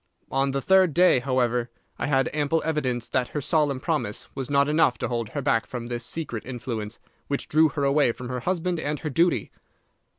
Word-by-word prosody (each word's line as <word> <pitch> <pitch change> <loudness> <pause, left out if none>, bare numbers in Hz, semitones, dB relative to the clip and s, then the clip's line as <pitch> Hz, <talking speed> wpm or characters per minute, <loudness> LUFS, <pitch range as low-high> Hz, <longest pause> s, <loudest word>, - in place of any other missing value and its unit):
On 135 +1 +1
the 135 0 -2
third 190 -5 +4
day, 180 -7 +5
however, 125 -2 0 0.3
I - - -1
had 135 -3 +2
ample 150 +2 0
evidence 130 -7 -1
that 125 -1 0
her 150 - -4
solemn 145 -1 +1
promise 150 -9 -2
was 135 -2 -4
not 140 0 +3
enough 150 -4 +3
to - - -2
hold 115 -3 -3
her 145 +2 -4
back 115 -5 +1
from 120 -1 -6
this 120 0 -3
secret 120 -5 -3
influence 115 -4 -5 0.3
which 140 - -2
drew 155 +1 +4
her 145 0 -3
away 140 -2 +3
from 125 +1 -8
her 125 0 -3
husband 175 +3 -1
and 150 -1 -2
her 155 - -3
duty. 170 +6 +1
140 Hz, 200 wpm, -25 LUFS, 125-155 Hz, 0.3 s, day